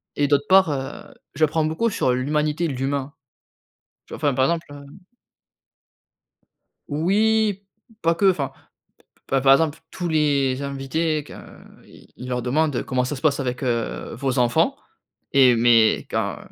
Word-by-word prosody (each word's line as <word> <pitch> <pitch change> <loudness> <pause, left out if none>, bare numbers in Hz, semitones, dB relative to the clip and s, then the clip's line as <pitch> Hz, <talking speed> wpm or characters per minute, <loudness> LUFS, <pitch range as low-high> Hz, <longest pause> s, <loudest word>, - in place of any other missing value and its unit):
Et 145 - +1
d'autre 145 0 +2
part, 190 -1 +5
heu, 135 0 -6 0.2
j'apprends 155 +1 +1
beaucoup 160 +9 0
sur 130 - 0
l'humanité, 150 +5 -1
l'humain, 135 0 -3 0.9
tu - - -10
vois? - - -5
Enfin 145 -2 +1
par 130 0 +2
exemple, 170 +2 -2
heu 145 0 -11 2.0
Oui 205 +6 +1 0.4
pas 165 +1 +2
que, 195 +3 +4
enfin, 140 -7 -3 0.7
p 135 0 +1
par 135 +1 +5
exemple 160 +2 +2
tous 175 -1 -4
les 140 -4 +1
invités, 145 +3 -2
que, - - -13
heu, - - -13 0.2
i - - -17
il 125 +1 -9
leur 125 -1 -2
demande: 145 +2 0
«Comment 125 0 -1
ça 140 +3 -4
se - - -9
passe 145 -3 +2
avec, 125 -1 -3
heu, 120 -3 -3
vos 130 +2 -2
enfants?» 120 -1 +2 0.6
et 130 -3 +6
mais 115 -1 +4
quand - - -2
140 Hz, 155 wpm, -22 LUFS, 130-160 Hz, 2.0 s, et